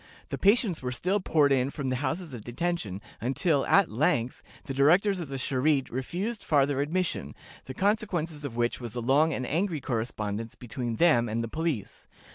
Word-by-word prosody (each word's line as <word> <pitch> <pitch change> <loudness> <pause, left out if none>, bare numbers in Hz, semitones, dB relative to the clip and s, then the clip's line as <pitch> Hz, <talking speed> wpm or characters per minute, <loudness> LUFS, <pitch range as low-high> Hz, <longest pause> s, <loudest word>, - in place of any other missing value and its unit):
The - - -3
patients 200 -3 +3
were 125 -1 -3
still 180 +11 0
poured 155 -6 +3
in 130 -1 +2
from 140 -2 -4
the 130 - 0
houses 155 +4 -3
of 115 -4 -7
detention, 120 - -3 0.2
until, 135 +4 +1
at 195 -3 +4
length, 120 0 0 0.2
the 135 - -5
directors 180 +9 +4
of 170 - -4
the 135 - -6
Charité 135 +1 +1
refused 185 - -3
farther 140 -2 +2
admission, 155 - -2 0.3
the 130 - -7
consequence 185 -7 0
of 135 -5 -5
which 120 0 0
was 120 -2 -6
a - - -2
long 140 +7 +3
and 130 -3 -2
angry 165 +3 0
correspondence 115 -3 -3
between 120 -1 -4
them 120 -7 +4
and 115 +2 -1
the - - -3
police. 155 - -3
140 Hz, 180 wpm, -28 LUFS, 120-170 Hz, 0.3 s, at